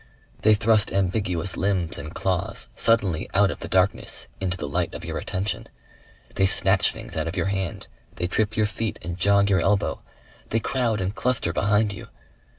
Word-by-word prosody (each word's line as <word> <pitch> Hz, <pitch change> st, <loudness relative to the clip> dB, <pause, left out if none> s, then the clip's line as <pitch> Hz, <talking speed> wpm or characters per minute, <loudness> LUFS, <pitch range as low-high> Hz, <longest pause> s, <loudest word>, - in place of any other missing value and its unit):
They 110 Hz, 0 st, +5 dB
thrust 110 Hz, -1 st, +3 dB
ambiguous 95 Hz, -2 st, 0 dB
limbs 95 Hz, -4 st, 0 dB
and 75 Hz, +2 st, -7 dB
claws 90 Hz, -10 st, -1 dB
suddenly 100 Hz, -8 st, +2 dB
out 100 Hz, 0 st, +4 dB
of -, -, -7 dB
the -, -, -6 dB
darkness 95 Hz, +1 st, 0 dB
into 90 Hz, -1 st, -2 dB
the 75 Hz, -, -4 dB
light 70 Hz, -, -1 dB
of -, -, -7 dB
your -, -, -3 dB
attention. 95 Hz, +3 st, -3 dB, 0.7 s
They 95 Hz, -, +3 dB
snatch -, -, +3 dB
things -, -, -9 dB
out 80 Hz, 0 st, -1 dB
of 85 Hz, +4 st, -4 dB
your 85 Hz, -, +1 dB
hand, 95 Hz, -5 st, -4 dB, 0.3 s
they 90 Hz, -, -2 dB
trip 110 Hz, +4 st, 0 dB
your 110 Hz, -, +3 dB
feet 110 Hz, 0 st, -3 dB
and 85 Hz, 0 st, -4 dB
jog 100 Hz, +2 st, +4 dB
your 95 Hz, -3 st, +3 dB
elbow. 100 Hz, +2 st, +1 dB, 0.5 s
They 115 Hz, -, +1 dB
crowd 115 Hz, -4 st, 0 dB
and 95 Hz, +2 st, -1 dB
cluster 115 Hz, -4 st, 0 dB
behind 105 Hz, +2 st, +2 dB
you. 95 Hz, -, -9 dB
95 Hz, 180 wpm, -24 LUFS, 90-105 Hz, 0.7 s, They